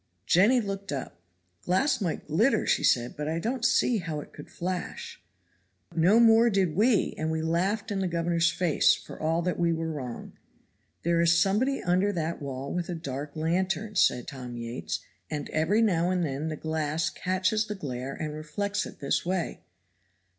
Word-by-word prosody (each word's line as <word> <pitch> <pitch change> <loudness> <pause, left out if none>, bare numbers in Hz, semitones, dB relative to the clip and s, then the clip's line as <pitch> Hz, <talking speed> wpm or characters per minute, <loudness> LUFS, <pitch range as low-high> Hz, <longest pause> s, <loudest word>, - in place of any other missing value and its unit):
Jenny 205 - +5
looked 200 -2 -4
up. 135 -10 -5 0.4
"Glass 255 +7 +1
might 175 -5 -2
glitter," 210 - +2
said - - +2
she, 120 -1 +3
"but 150 0 -4
I 160 - -1
don't 235 +7 -2
see 240 -1 +3
how 165 -4 -4
it - - -11
could 145 - -11
flash." 180 +1 -5 0.7
"No 180 +7 +5
more 230 0 +6
did 190 -7 +1
we, 220 +2 +3
and 155 0 -1
we 160 0 -1
laughed 195 +7 0
in 200 - -1
the 190 - 0
governor's 170 0 +1
face; 175 -3 +3
for - - -11
all 165 +2 +1
that 180 0 -1
we 170 -1 +2
were 165 0 -2
wrong. 130 -6 -6 0.7
'There 170 0 +2
is 170 0 +4
somebody 215 +10 +1
under 185 +3 +2
that 165 -2 -3
wall 135 -1 -5
with 175 0 -3
a 175 - -2
dark 145 -2 -6
lantern,' 190 +6 -1
said 125 -1 +3
Tom 125 -3 -7
Yates, 115 -9 -4 0.3
'and 150 -2 -4
every 185 +9 +2
now 175 -5 +2
and 180 -1 +1
then 145 +2 -3
the 155 - -3
glass 160 0 -1
catches 185 +4 0
the 210 - -4
glare 135 -6 -5
and 155 -1 -4
reflects 200 +7 -3
it - - -13
this 140 - 0
way.' 180 0 -2
170 Hz, 180 wpm, -28 LUFS, 155-195 Hz, 0.7 s, more